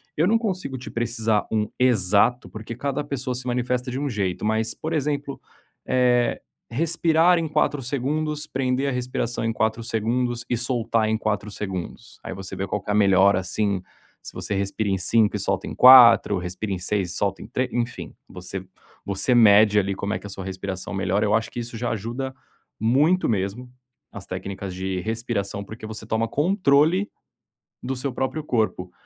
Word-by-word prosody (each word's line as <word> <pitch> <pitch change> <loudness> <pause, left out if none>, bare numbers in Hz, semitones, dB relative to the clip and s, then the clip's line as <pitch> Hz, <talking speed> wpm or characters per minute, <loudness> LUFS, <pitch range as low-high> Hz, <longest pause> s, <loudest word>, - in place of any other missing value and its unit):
Eu 155 - +2
não 225 +3 +4
consigo 185 - -3
te 125 - -9
precisar 115 -2 0
um 105 -1 +1
exato, 120 0 +3
porque 110 +2 -7
cada 140 +3 -2
pessoa 130 -3 -3
se 125 - -6
manifesta 125 +1 -1
de 130 - -3
um 145 -1 -2
jeito, 95 -4 -2
mas, 110 +1 0
por 160 +1 -5
exemplo, 145 -2 -2 0.5
eh, 125 -1 +2 0.3
respirar 165 +4 +3
em 165 -1 -1
4 145 -2 +1
segundos, 150 +4 -2
prender 130 0 -1
a - - -1
respiração 125 -2 -2
em 115 - +1
4 110 +1 -1
segundos 120 +2 -1
e 120 - +1
soltar 115 -2 0
em 110 - +1
4 105 -1 -2
segundos. 95 -4 -6
Aí - - -5
você 95 0 -7
vê 95 - -2
qual 105 +2 -2
que - - -11
é - - +2
a - - +1
melhora 100 -1 +5
assim, 95 +1 -1 0.4
se - - -9
você 100 - -3
respira 100 +2 -1
em 95 - +1
5 105 +4 +2
e - - -1
solta 95 -1 -1
em - - -6
4. 120 -5 +8
respira 90 +4 -5
em 90 - -3
6 95 -1 -1
e - - -6
solta 100 0 -1
3, 130 -1 -1
enfim, 120 0 -3
você 95 +1 -7 0.4
você 100 +6 0
mede 105 -2 +6
ali, 100 -1 -1
como 100 +2 -3
é - - -2
que - - -9
a - - -9
sua 95 -1 -7
respiração 95 0 -5
melhora, 100 +2 0
eu 105 - +1
acho 115 +1 +1
que 120 - -5
isso 115 0 -7
já 120 +2 -2
ajuda 120 +5 -4 0.4
muito 145 - +3
mesmo, 105 +4 -2 0.4
as 100 -1 -9
técnicas 95 0 -6
de 95 0 -3
respiração, 110 -2 -3
porque 110 +2 -10
você 110 0 -8
toma 110 +1 0
controle 165 - +2 0.7
do 135 +1 -2
seu 130 +1 -3
próprio 130 +5 -2
corpo. 110 -9 -1
115 Hz, 185 wpm, -24 LUFS, 100-130 Hz, 0.7 s, 4